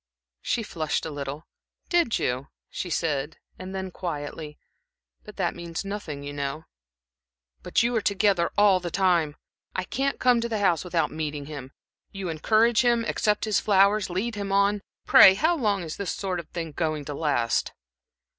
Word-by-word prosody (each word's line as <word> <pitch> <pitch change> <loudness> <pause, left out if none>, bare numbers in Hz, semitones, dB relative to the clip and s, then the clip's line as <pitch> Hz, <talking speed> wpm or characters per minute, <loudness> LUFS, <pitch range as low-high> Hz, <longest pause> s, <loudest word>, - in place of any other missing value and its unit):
She 230 - -1
flushed 160 -7 -2
a 160 - -4
little. 145 +2 -6 0.4
"Did 340 -10 +2
you?" 125 +2 -2 0.2
she 180 - -4
said, 155 -2 -1 0.2
and 185 +1 -7
then, 190 -1 -4
quietly: 150 -3 -6 0.7
"But - - -12
that - - 0
means 170 +2 -5
nothing, 185 -8 -5
you 145 0 -6
know." 140 +2 -4 1.0
"But - - +1
you 240 +1 0
are 225 - +2
together 200 -3 +2
all 205 -2 +5
the 175 -1 -4
time. 170 -5 +2 0.4
I 185 - -1
can't 270 +8 -1
come 250 -2 +4
to 235 - -2
the 220 - -1
house 185 -5 +2
without 175 -2 0
meeting 150 -2 -4
him. 140 -3 -8 0.4
You 195 -3 -5
encourage 215 +9 +3
him, 235 -2 +2
accept 210 -2 0
his 215 -2 +2
flowers, 200 0 +3
lead 200 +7 -2
him 200 -2 -4
on. 200 +1 +2 0.2
Pray, 190 - +8
how 320 - +2
long 205 - 0
is 160 -2 -6
this 200 -2 -3
sort 185 -3 -3
of 165 - -9
thing 165 -2 -5
going 155 -2 -2
to 145 - -5
last?" 140 -6 0
185 Hz, 175 wpm, -26 LUFS, 155-205 Hz, 1.0 s, Pray